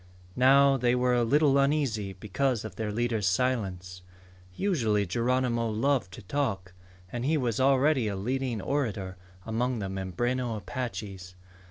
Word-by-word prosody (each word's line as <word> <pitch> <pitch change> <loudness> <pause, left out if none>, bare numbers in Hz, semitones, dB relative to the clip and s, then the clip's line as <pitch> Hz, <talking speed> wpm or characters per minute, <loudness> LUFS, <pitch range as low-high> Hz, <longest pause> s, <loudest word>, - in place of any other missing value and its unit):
Now 135 +2 +5
they 125 -1 +2
were 125 0 +2
a 120 -1 +3
little 140 +3 +3
uneasy 135 -9 0
because 110 +4 -1
of 105 -4 -8
their 110 0 -3
leader's 115 -2 0
silence. 90 -5 -1 0.5
Usually 115 - +1
Geronimo 120 +2 0
loved 115 -2 0
to 115 - -10
talk, 95 -6 -2 0.4
and 120 0 -4
he 155 +4 +2
was 120 -5 -1
already 135 -1 +3
a 100 - -2
leading 120 +1 -2
orator 105 -10 -2 0.3
among 120 +3 -1
the 100 -3 -4
Mimbreno 115 +6 -2
Apaches. 100 -4 -6
120 Hz, 140 wpm, -28 LUFS, 100-130 Hz, 0.5 s, Now